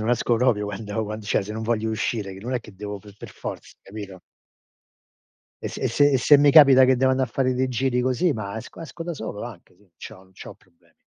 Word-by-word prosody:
non 110 - -3
esco 120 -1 +1
proprio 115 -4 +1
quando 105 +2 -4
quando 105 0 -7
cioè, - - +1
se 105 - -7
non 110 +1 -5
voglio 110 -1 -1
uscire, 110 -2 -3
che 95 - -11
non 125 +5 -4
è 125 - -1
che 105 -3 -15
devo 105 +1 -7
per 100 0 -15
per - - -9
forza - - -8
capito? 100 -2 -9 1.4
E - - -1
se - - -8
e - - 0
se 145 +5 +3
e 135 - +2
se 145 +4 +6
mi 145 0 +5
capita 140 -3 +8
che 130 0 +3
devo 130 +1 +2
andare 130 0 0
a - - +1
fare 130 0 -1
dei 130 +1 0
giri 125 0 0
così, 130 +7 +1
ma 110 -3 -6
esco 110 - -9
esco 165 +1 -8
da 170 0 -4
solo 110 -6 -6
anche, 105 -7 -12
sì. 100 0 -27
C'ho - - -10
non 95 0 -20
c'ho - - -11
problemi. 85 - -31
115 Hz, 250 wpm, -23 LUFS, 105-130 Hz, 1.4 s, capita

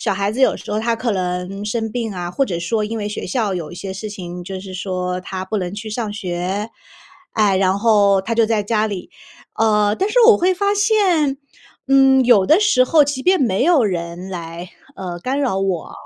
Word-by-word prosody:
小 - - 0
孩 200 +1 -1
子 260 - -4
有 - - +4
时 - - -10
候 210 - 0
他 230 +1 0
可 235 0 -2
能 180 +1 -3
生 225 +1 -2
病 230 -3 -3
啊， 175 -1 -4
或 275 - -1
者 175 -9 -3
说 215 +6 -1
因 225 +2 -4
为 205 -1 -3
学 210 - -5
校 210 0 -1
有 165 -4 -5
一 - - -9
些 190 +1 -6
事 210 +3 -6
情， 180 -3 -7
就 190 +1 -6
是 190 -1 -9
说 185 -1 -3
他 185 0 -5
不 210 +3 -3
能 180 +1 -4
去 215 +1 -7
上 220 -1 -3
学， 190 +2 -3 0.6
哎， 205 -3 +3
然 190 0 +2
后 205 -3 +4
他 225 +4 -4
就 225 -1 +3
在 215 -2 0
家 215 +1 0
里。 200 -4 -6 0.5
呃， 210 -2 +3
但 390 - 0
是 - - +1
我 455 - +7
会 370 +1 +2
发 400 +2 +1
现， 385 -10 +2 0.5
嗯， 270 -1 +5
有 210 -6 +5
的 320 - +5
时 345 -12 +4
候 305 +3 +4
即 280 -2 -3
便 370 +1 +4
没 195 -6 +1
有 320 -9 +4
人 175 0 -4
来， 170 0 -7 0.2
呃， 180 -5 -6
干 265 +6 -2
扰 240 -9 0
我， 190 -4 -2
210 Hz, 235 characters per minute, -19 LUFS, 185-250 Hz, 0.6 s, 我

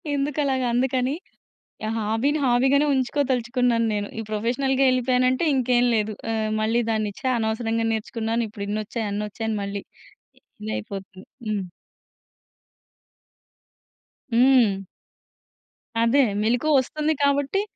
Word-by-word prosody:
ఎందుకు 285 +1 -1
అలాగా 260 -2 0
అందుకని. 255 +2 +1 0.7
ఆహ్, 225 +1 -2
హాబీని 225 +8 0
హాబీగానే 265 +4 +3
ఉంచుకోదలుచుకున్నాను 250 -3 +1
నేను. 205 -1 -2
ఈ - - -1
ప్రొఫెషనల్‌గా 255 +5 0
ఎళ్ళిపోయాను 255 0 +2
అంటే 260 +6 -1
ఇంకేం 245 -1 +2
లేదు. 215 0 0 0.2
ఆహ్, 220 -1 -1
మళ్ళీ 225 +2 +2
దాన్ని, 215 -2 -1
"ఛ! - - -23
అనవసరంగా 225 0 -1
నేర్చుకున్నాను. 225 +1 -2
ఇప్పుడిన్ని 205 0 -4
ఒచ్చాయి, 225 0 -3
అన్నొచ్చాయి" 210 +2 -4
అని 215 - -1
మళ్ళీ 200 0 -4 0.8
ఇదయిపోతుంది. 185 - -6 0.2
హ్మ్. 205 -2 -1 2.7
హ్మ్. 240 -5 +5 1.2
అదే. 245 +5 +4 0.2
మెలుకువ 245 +7 +1
వస్తుంది 305 +4 -1
కాబట్టి 280 +6 +2
235 Hz, 110 wpm, -24 LUFS, 215-265 Hz, 2.7 s, హ్మ్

